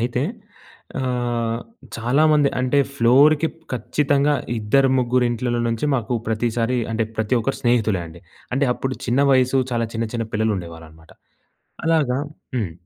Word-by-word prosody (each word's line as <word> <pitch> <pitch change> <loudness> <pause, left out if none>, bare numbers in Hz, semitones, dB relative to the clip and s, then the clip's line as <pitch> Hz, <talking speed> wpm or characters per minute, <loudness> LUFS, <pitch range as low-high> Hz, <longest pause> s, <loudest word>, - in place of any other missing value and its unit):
అయితే 120 +1 -1 0.8
ఆహ్, 120 -2 -1 0.4
చాలా 120 +6 +1
మంది 145 -2 +4
అంటే 130 +3 +2 0.2
ఫ్లోర్‌కి 145 +6 +5 0.2
ఖచ్చితంగా! 140 +4 +1 0.2
ఇద్దరు 135 +6 +3
ముగ్గురు 125 0 +2
ఇంట్లలో 120 0 -1
నుంచి 115 +5 -1
మాకు 120 -1 -1
ప్రతిసారి 115 +2 0
అంటే, 115 0 0
ప్రతి 110 +3 +1
ఒక్కరు 135 +5 -2
స్నేహితులే 110 -6 +2
అండి. 80 +1 -13 0.3
అంటే 135 +1 +2
అప్పుడు 130 +1 -3
చిన్న 125 +3 +2
వయసు, 130 0 +3
చాలా 115 -1 0
చిన్న, 115 0 -1
చిన్న 115 -1 -2
పిల్లలు 110 0 +1
ఉండేవాళ్ళు 85 -2 -8
అన్నమాట. 80 +1 -19 0.7
అలాగా 150 -6 +2 0.4
హ్మ్. 100 -8 -2
120 Hz, 140 wpm, -21 LUFS, 115-135 Hz, 0.8 s, ఫ్లోర్‌కి